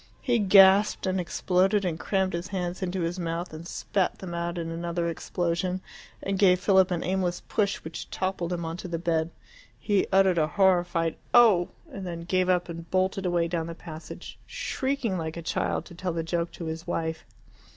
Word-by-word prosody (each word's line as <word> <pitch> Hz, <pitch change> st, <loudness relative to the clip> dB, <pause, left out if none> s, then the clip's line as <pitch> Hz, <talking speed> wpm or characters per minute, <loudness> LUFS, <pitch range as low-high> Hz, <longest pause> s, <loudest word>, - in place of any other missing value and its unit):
He 245 Hz, -3 st, +2 dB
gasped 195 Hz, +1 st, +6 dB
and 190 Hz, 0 st, 0 dB
exploded 185 Hz, +3 st, +1 dB
and 165 Hz, -2 st, -2 dB
crammed 190 Hz, -2 st, 0 dB
his 170 Hz, +1 st, -3 dB
hands 180 Hz, -2 st, -3 dB
into 185 Hz, 0 st, -2 dB
his 170 Hz, +2 st, -2 dB
mouth 170 Hz, 0 st, -3 dB
and 160 Hz, +2 st, -8 dB
spat 190 Hz, 0 st, -1 dB
them 180 Hz, -3 st, -7 dB
out 170 Hz, +1 st, -3 dB
in 165 Hz, -1 st, -3 dB
another 170 Hz, +1 st, -2 dB
explosion, 175 Hz, +2 st, -1 dB, 0.4 s
and 195 Hz, -1 st, -1 dB
gave 185 Hz, -3 st, +5 dB
Philip 190 Hz, -1 st, +4 dB
an 175 Hz, -2 st, -1 dB
aimless 180 Hz, -2 st, -1 dB
push, 200 Hz, -2 st, +1 dB
which 160 Hz, +1 st, -7 dB
toppled 185 Hz, -2 st, -2 dB
him 170 Hz, -2 st, -2 dB
on 165 Hz, +1 st, -4 dB
to 185 Hz, -, -6 dB
the 170 Hz, -1 st, -2 dB
bed. 165 Hz, -1 st, 0 dB, 0.5 s
He 205 Hz, -3 st, +1 dB
uttered 190 Hz, -2 st, +4 dB
a 155 Hz, -, +2 dB
horrified 175 Hz, -3 st, +2 dB, 0.2 s
Oh! 215 Hz, -8 st, +6 dB, 0.2 s
and 195 Hz, -2 st, -6 dB
then 170 Hz, -1 st, -5 dB
gave 185 Hz, +1 st, +1 dB
up, 180 Hz, 0 st, +2 dB
and 170 Hz, -1 st, -8 dB
bolted 185 Hz, 0 st, 0 dB
away 175 Hz, -1 st, +1 dB
down 165 Hz, -1 st, -2 dB
the 170 Hz, -, -6 dB
passage, 160 Hz, -2 st, -9 dB
shrieking 260 Hz, -8 st, -2 dB
like 160 Hz, 0 st, -4 dB
a 170 Hz, -, -6 dB
child, -, -, -1 dB
to 175 Hz, -, -12 dB
tell 180 Hz, 0 st, -3 dB
the 165 Hz, 0 st, -2 dB
joke 170 Hz, +1 st, -2 dB
to 170 Hz, -, -7 dB
his 160 Hz, +1 st, -5 dB
wife. 160 Hz, -2 st, -2 dB
175 Hz, 195 wpm, -27 LUFS, 170-190 Hz, 0.5 s, gasped